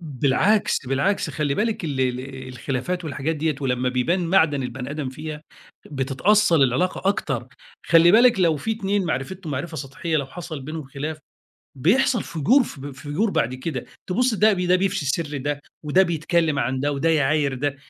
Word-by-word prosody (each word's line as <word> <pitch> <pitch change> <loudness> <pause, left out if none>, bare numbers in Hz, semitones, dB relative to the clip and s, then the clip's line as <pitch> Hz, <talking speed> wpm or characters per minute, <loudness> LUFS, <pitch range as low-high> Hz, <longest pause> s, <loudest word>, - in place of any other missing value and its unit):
بالعكس، 150 - +1
بالعكس، 150 +7 0
خلّي 145 0 -1
بالِك 215 -1 -1
ال 140 -4 -2
ال 130 +1 -3
الخلافات 135 +8 -3
والحاجات 155 +1 -2
ديّة، 155 0 0
ولمّا 125 -1 0
بيبان 165 +9 0
معدن 160 -6 +3
البني 125 +1 -5
آدم 150 -2 -3
فيها، 150 +3 -7 0.5
بتتأصل 155 +6 +3
العلاقة 180 +9 +1
أكتر. 200 - -1 0.4
خلّي 170 +1 +6
بالِك 235 -1 +5
لو 165 -4 +3
في 220 +10 -2
اتنين 205 -2 -1
معرفتهم 160 +3 -4
معرفة 160 +5 -4
سَطحيّة، 150 +4 -3
لو 140 -3 -1
حصل 160 0 -7
بينهم 155 +3 -6
خلاف 145 +4 -5 0.6
بيحصل 235 - +2
فُجُور 230 - +3
فب 140 - -8
فُجُور 145 +10 -2
بعد 125 -8 0
كده، 130 0 -4 0.2
تبص 245 +6 +2
ده 215 0 +4
ده 180 -1 +2
بيفشي 185 -4 0
سِرّ 145 +1 -1
ده، 145 +2 -3 0.2
وده 155 +6 +4
بيتكلّم 165 -2 0
عن 130 +2 -1
ده، 145 +2 0
وده 145 +3 0
يعاير 145 -2 +2
ده. 140 +2 -2
155 Hz, 165 wpm, -23 LUFS, 135-180 Hz, 0.6 s, خلّي